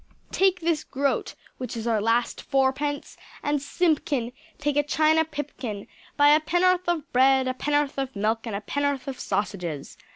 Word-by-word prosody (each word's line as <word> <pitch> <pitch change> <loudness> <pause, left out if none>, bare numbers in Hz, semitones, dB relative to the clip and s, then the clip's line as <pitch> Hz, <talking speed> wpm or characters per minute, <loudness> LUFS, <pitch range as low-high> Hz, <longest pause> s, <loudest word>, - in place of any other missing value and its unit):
Take 375 -1 +2
this 325 -2 0
groat 275 +1 -1 0.2
(which 250 -2 -5
is 225 - -4
our 225 -3 +1
last 230 +3 +1
fourpence) 275 +1 -1 0.3
and 290 -1 0
Simpkin, 285 -6 0 0.2
take 290 -1 -1
a 290 - +4
china 310 +2 +3
pipkin; 285 -9 -6 0.3
buy 290 0 +6
a 300 +1 +6
penn'orth 355 +3 +2
of 330 -3 -2
bread, 265 +1 +4
a 255 - 0
penn'orth 290 +1 0
of 270 -2 -3
milk 220 +3 -1
and 215 - -3
a 200 - -3
penn'orth 285 +2 -1
of 265 -2 -5
sausages. 175 -8 -3
280 Hz, 165 wpm, -25 LUFS, 245-300 Hz, 0.3 s, buy